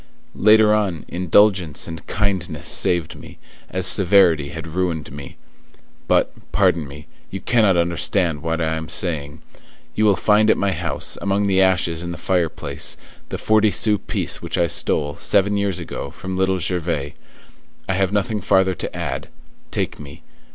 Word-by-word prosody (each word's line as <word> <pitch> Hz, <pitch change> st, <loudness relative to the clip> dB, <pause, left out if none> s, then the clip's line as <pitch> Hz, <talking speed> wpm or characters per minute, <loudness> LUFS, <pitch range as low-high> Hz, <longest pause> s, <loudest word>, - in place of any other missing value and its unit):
Later 105 Hz, +1 st, +5 dB
on, 100 Hz, -7 st, -1 dB
indulgence 90 Hz, -2 st, +2 dB
and 80 Hz, -1 st, -9 dB
kindness 95 Hz, -7 st, -2 dB
saved 85 Hz, -3 st, +1 dB
me, -, -, -13 dB, 0.3 s
as 95 Hz, 0 st, -1 dB
severity 90 Hz, -6 st, +5 dB
had 80 Hz, +3 st, -7 dB
ruined 80 Hz, -2 st, -3 dB
me. 70 Hz, -1 st, -10 dB, 0.7 s
But, -, -, +2 dB, 0.2 s
pardon 80 Hz, -4 st, +2 dB
me, 75 Hz, +2 st, -11 dB, 0.2 s
you 95 Hz, -, -6 dB
cannot 105 Hz, -4 st, +2 dB
understand 85 Hz, -1 st, 0 dB
what 80 Hz, 0 st, -2 dB
I 80 Hz, -1 st, 0 dB
am 80 Hz, 0 st, -6 dB
saying. 75 Hz, -3 st, -2 dB, 0.5 s
You 110 Hz, -, +1 dB
will 100 Hz, -2 st, +4 dB
find 105 Hz, +4 st, +3 dB
at -, -, +4 dB
my 100 Hz, -1 st, 0 dB
house, 85 Hz, -4 st, -2 dB
among 100 Hz, +1 st, 0 dB
the 95 Hz, -1 st, +3 dB
ashes 90 Hz, -3 st, +1 dB
in 85 Hz, -, -5 dB
the 85 Hz, -, -6 dB
fireplace, 90 Hz, -4 st, -2 dB, 0.3 s
the -, -, -4 dB
forty 110 Hz, 0 st, +3 dB
sou 105 Hz, 0 st, +1 dB
piece -, -, -4 dB
which -, -, -3 dB
I 85 Hz, -, +3 dB
stole, 75 Hz, -2 st, 0 dB
seven 100 Hz, +1 st, +2 dB
years 100 Hz, -3 st, -1 dB
ago, 80 Hz, -4 st, -6 dB
from 95 Hz, +5 st, -7 dB
Little 95 Hz, 0 st, +1 dB
Gervais. 85 Hz, -5 st, -2 dB, 0.7 s
I 95 Hz, -, 0 dB
have 95 Hz, 0 st, 0 dB
nothing 105 Hz, +1 st, -1 dB
farther 95 Hz, 0 st, +2 dB
to -, -, -6 dB
add; -, -, -4 dB, 0.4 s
take -, -, -2 dB
me. 70 Hz, -1 st, -12 dB
90 Hz, 160 wpm, -20 LUFS, 80-100 Hz, 0.7 s, Later